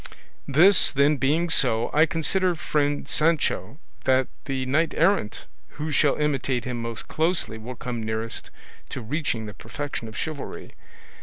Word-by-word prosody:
This, 175 +8 +6
then, 140 +1 +3
being 150 +6 +1
so, 120 -6 +2
I 155 +2 +5
consider, 180 +2 +1
friend 145 -2 -1
Sancho, 155 -2 0 0.3
that 130 0 +3 0.2
the 135 -1 -2
knight 155 +5 +1
errant 170 - +1 0.3
who 150 +1 -3
shall 145 0 +3
imitate 135 -5 -1
him 125 -2 -3
most 115 -1 -6
closely 160 -8 -1
will 125 +3 -7
come 120 0 -5
nearest 110 +1 -3 0.4
to 130 - -5
reaching 120 -3 -2
the 105 - -8
perfection 145 -1 -6
of 110 - -9
chivalry. 155 -3 -6
140 Hz, 145 wpm, -25 LUFS, 120-155 Hz, 0.4 s, This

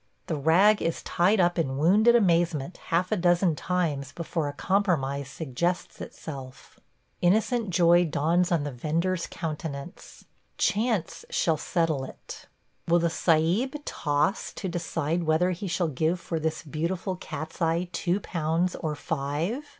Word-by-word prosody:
The 160 - -2
rag 175 +9 +4
is 165 - -2
tied 190 +5 +2
up 175 -1 +3
in 135 -5 -1
wounded 210 +10 +5
amazement 170 - +2
half 175 +4 0
a - - +3
dozen 175 -2 +3
times 150 -6 -1
before 165 -2 -3
a 145 - -4
compromise 145 -8 0
suggests 165 +5 -3
itself. 135 -4 -9 0.4
Innocent 220 +4 +2
joy 175 0 +5
dawns 170 +4 +1
on 165 -4 +2
the 145 - -3
vender's 165 +7 -1
countenance 155 -1 -7 0.2
– - - -44
chance 215 -5 0
shall 160 - +1
settle 160 -4 0
it. 130 - -10 0.4
Will 170 +1 +4
the 170 -1 +1
Sahib 175 - +2
toss 150 +6 0
to 190 - -5
decide 170 -1 -2
whether 160 +4 +2
he 180 +3 -4
shall 170 0 0
give 160 +5 0
for 165 -1 -3
this 160 0 -2
beautiful 170 +5 -3
cat's 160 -2 -7
eye 165 +2 +1
two 180 +2 0
pounds 165 +2 -1
or 155 -2 -3
five? 160 - -2
170 Hz, 145 wpm, -27 LUFS, 155-180 Hz, 0.4 s, wounded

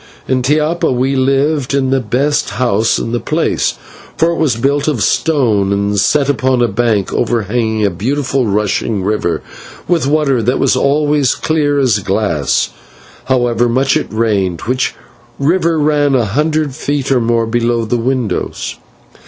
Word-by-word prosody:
In 130 -1 +1
Tiapa 150 +5 +1
we 130 +2 0
lived 135 +1 +1
in 130 -1 0
the 135 - +2
best 135 +6 0
house 115 -3 +1
in 115 - -3
the 120 - -1
place, - - -1 0.4
for 165 +1 +2
it 170 - -3
was 145 -8 +2
built 140 +5 0
of 140 -9 0
stone 115 -11 +1
and 100 0 0
set 140 +7 +2
upon 130 -3 +1
a - - +3
bank 110 -2 0
overhanging 110 -1 0
a 100 - +1
beautiful 130 +6 -1
rushing 105 0 -1
river 105 -4 -1 0.4
with 165 -5 +1
water 140 -4 +1
that 125 +4 0
was - - +2
always 145 0 +2
clear 150 -2 0
as 125 -7 +2
glass, 95 -7 0 0.5
however 120 -2 +1
much 135 +3 +1
it - - -1
rained, 100 -6 0
which 130 +3 -1 0.4
river 165 +3 +1
ran 145 -2 +2
a 120 -3 +2
hundred 150 +6 0
feet 140 0 -2
or 130 -2 +3
more 115 0 +1
below 115 0 0
the 120 +3 -1
windows. 125 -1 -2
125 Hz, 155 wpm, -14 LUFS, 110-145 Hz, 0.5 s, a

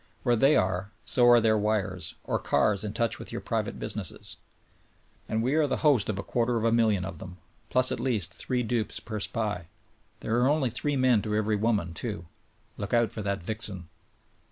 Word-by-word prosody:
Where 120 - +3
they 135 +6 +4
are 95 +1 0 0.2
so 120 -1 +5
are 120 0 +8
their 110 -1 +3
wires, 105 -2 -1
or - - -2
ears 105 -1 +3
in 105 - -3
touch 115 0 -1
with - - -7
your - - -4
private - - -3
business. - - -3 0.9
And 110 +1 0
we 130 +4 +1
are 155 -1 +3
the - - -1
host 135 -10 +4
of 105 - -1
a 100 - -3
quarter 120 0 0
of 110 - -2
a 115 - +3
million 110 -5 +2
of 95 -4 -7
them; 90 -1 -9 0.3
plus 130 0 +3
at - - -2
least 110 -9 -1
three 125 -1 -2
dupes 115 -2 -1
per 110 -2 -6
SPY. 105 -5 -2 0.5
There 115 +2 0
are 125 - +3
only 145 -5 +1
three 145 +5 -1
men 130 -4 +4
to 105 0 -2
every 110 0 +1
woman, 105 -5 0
too. 100 -3 -4 0.5
Look 100 +4 -2
out 115 -1 +2
for 110 - -5
that 100 -3 -2
vixen 100 -4 0
110 Hz, 205 wpm, -27 LUFS, 100-120 Hz, 0.9 s, are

